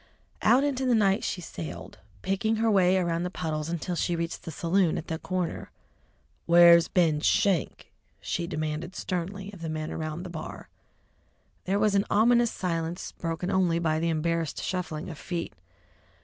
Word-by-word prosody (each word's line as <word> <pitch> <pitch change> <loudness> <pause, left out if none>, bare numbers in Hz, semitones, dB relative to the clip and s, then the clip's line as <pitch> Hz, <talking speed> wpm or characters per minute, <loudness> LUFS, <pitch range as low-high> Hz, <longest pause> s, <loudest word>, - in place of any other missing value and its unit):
Out 255 +3 +5
into 265 -2 0
the 245 - +4
night 200 -3 +3
she 180 - -2
sallied, 85 - -8 0.2
picking 220 +4 0
her 225 0 +2
way 190 -2 +4
around 170 -2 0
the 180 - -2
puddles 155 -4 -3
until 170 +1 -3
she 175 +1 0
reached 165 0 -3
the - - -5
saloon 175 0 +1
at 160 - -5
the 160 -1 -3
corner. 185 -2 -3 0.8
"Where's 170 0 +7
Ben 165 -5 +2
Schenk?" 190 -3 +1 0.3
she 170 -1 -3
demanded 155 +1 -4
sternly 190 +3 -4
of 180 - -12
the 165 - -4
men 155 0 -4
around 155 +2 -4
the 180 - -7
bar. 160 -2 -8 1.0
There 195 +2 +1
was 210 0 +2
an 200 0 +2
ominous 235 +3 +4
silence, 170 -2 -3
broken 170 +2 -3
only 180 -3 +2
by 160 -2 0
the 165 +1 0
embarrassed 165 -1 -1
shuffling 175 -4 -3
of 160 -4 -8
feet. 175 -2 -4
175 Hz, 165 wpm, -27 LUFS, 165-195 Hz, 1.0 s, Where's